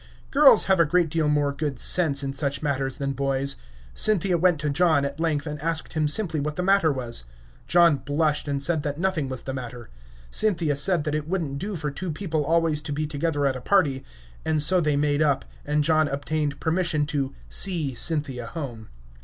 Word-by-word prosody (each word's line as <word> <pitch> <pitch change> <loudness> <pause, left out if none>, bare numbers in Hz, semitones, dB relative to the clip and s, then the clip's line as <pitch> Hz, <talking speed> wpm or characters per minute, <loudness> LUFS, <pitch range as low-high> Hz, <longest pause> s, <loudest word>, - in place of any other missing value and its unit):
Girls 280 -5 +7
have 190 -2 +2
a - - +6
great 170 +1 +1
deal 160 -2 0
more 145 -1 +1
good 140 -2 -4
sense 145 -1 +4
in 135 0 -3
such 140 +1 -3
matters 135 -2 -1
than 140 0 -3
boys. 135 0 -2 0.4
Cynthia 195 - +2
went 175 -2 +2
to 150 - -1
John, 155 -2 +2
at 140 +2 -6
length, 160 -3 -1
and 150 -1 -6
asked 165 0 -3
him 155 -1 0
simply 160 -1 +1
what 150 +1 -3
the 180 - -3
matter 195 -4 +3
was. 120 - -3 0.4
John 170 -4 +4
blushed, 150 +3 -1
and 140 -1 -2
said 160 0 +1
that 145 0 -4
nothing 170 -6 -1
was 130 -2 -7
the 135 - -5
matter. 125 -2 -8 0.4
Cynthia 170 -9 +1
said 155 +3 +2
that 150 - -3
it 150 0 -3
wouldn't 160 -6 -3
do 200 +3 -5
for 150 -3 -4
two 185 +6 -5
people 160 -2 -3
always 160 0 0
to 150 - -7
be 150 +2 -2
together 145 -1 -2
at 135 -1 0
a 130 - -7
party; 140 -5 +1 0.4
and 160 -1 0
so 180 +5 +4
they 150 -2 0
made 145 +1 0
up, 145 -3 +1 0.2
and 150 0 +1
John 155 0 +2
obtained 145 +1 -3
permission 160 -2 0
to 140 -2 -3
"see" 165 -8 +3
Cynthia 135 -3 -2
home. 120 -8 -8
150 Hz, 205 wpm, -24 LUFS, 140-165 Hz, 0.4 s, Girls